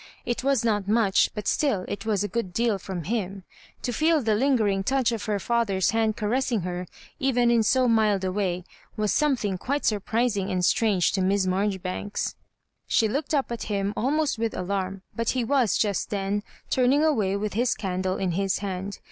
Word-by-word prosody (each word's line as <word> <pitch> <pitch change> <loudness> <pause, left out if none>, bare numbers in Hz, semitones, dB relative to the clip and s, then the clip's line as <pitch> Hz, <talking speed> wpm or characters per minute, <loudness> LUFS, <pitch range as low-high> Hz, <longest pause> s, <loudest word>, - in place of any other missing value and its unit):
It 240 +1 -2
was 270 -4 +2
not 205 -3 +1
much, 210 -2 +3
but 210 -2 -4
still 240 -12 +1
it 205 +2 -5
was 205 -2 +1
a - - -1
good 195 -2 -3
deal 225 -1 +1
from 185 -2 -5
him. 195 0 -3 0.4
To 245 - -1
feel 315 +5 +3
the 225 -5 +1
lingering 215 -5 +2
touch 260 +1 +1
of 225 -3 -3
her 210 -1 0
father's 200 -2 +1
hand 225 -1 +1
caressing 235 +1 0
her, 180 0 -4 0.3
even 245 -3 +2
in 235 -1 +4
so 255 +4 +3
mild 215 -4 +3
a 185 - 0
way, 185 -2 -1 0.3
was 210 -1 +1
8<nQe 295 -3 +2
thing 200 -3 -2
quite 285 +7 -2
surprising 215 -1 0
and 180 -2 0
strange 205 -5 +2
to 195 - 0
Miss 195 +1 +2
Mar 185 +2 +1
joribanks. 190 +1 -3 0.5
She 225 - +3
looked 285 +7 -1
up 275 -4 0
at 235 - -4
him 200 0 -1
almost 285 +1 0
with 230 -1 -1
alarm, 190 +1 -3
but 230 -1 -1
he 250 - +1
was 250 -2 +2
just 205 -3 0
then 200 0 -1 0.3
turning 260 +4 +3
away 215 -11 +2
with 210 0 -3
his 240 +4 +1
candle 185 -2 -2
in 185 -2 -1
his 195 +2 0
hand. 195 0 -4
210 Hz, 195 wpm, -26 LUFS, 195-235 Hz, 0.5 s, in